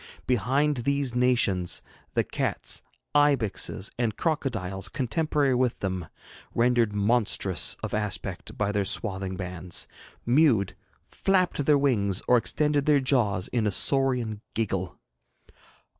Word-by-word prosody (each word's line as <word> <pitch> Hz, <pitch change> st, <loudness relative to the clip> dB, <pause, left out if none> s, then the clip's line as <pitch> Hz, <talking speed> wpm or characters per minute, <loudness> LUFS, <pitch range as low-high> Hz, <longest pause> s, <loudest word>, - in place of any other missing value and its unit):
Behind 135 Hz, +5 st, +1 dB
these 140 Hz, +1 st, -1 dB
nations, 120 Hz, -8 st, +2 dB, 0.3 s
the -, -, +3 dB
cats, -, -, -3 dB, 0.3 s
ibixes, 135 Hz, -8 st, +1 dB
and 115 Hz, -4 st, 0 dB
crocodiles 115 Hz, -, -2 dB
contemporary 145 Hz, +1 st, 0 dB
with 125 Hz, -1 st, +1 dB
them 95 Hz, -4 st, -3 dB, 0.5 s
rendered 120 Hz, -2 st, +3 dB
monstrous 105 Hz, -3 st, +1 dB
of -, -, -4 dB
aspect 105 Hz, -2 st, -3 dB
by 105 Hz, -1 st, 0 dB
their 105 Hz, -1 st, 0 dB
swathing 95 Hz, -1 st, -1 dB
bands 90 Hz, -1 st, -5 dB, 0.4 s
mewed, 120 Hz, -, +3 dB, 0.3 s
flapped 185 Hz, -6 st, +1 dB
their 150 Hz, -1 st, +6 dB
wings, 105 Hz, -9 st, +1 dB
or 125 Hz, -, +6 dB
extended 145 Hz, +5 st, +1 dB
their 150 Hz, -2 st, +5 dB
jaws 120 Hz, -9 st, +1 dB
in 115 Hz, -3 st, 0 dB
a -, -, +1 dB
saurian 125 Hz, -1 st, +1 dB
giggle. 95 Hz, -5 st, -2 dB
120 Hz, 115 wpm, -26 LUFS, 100-140 Hz, 0.5 s, their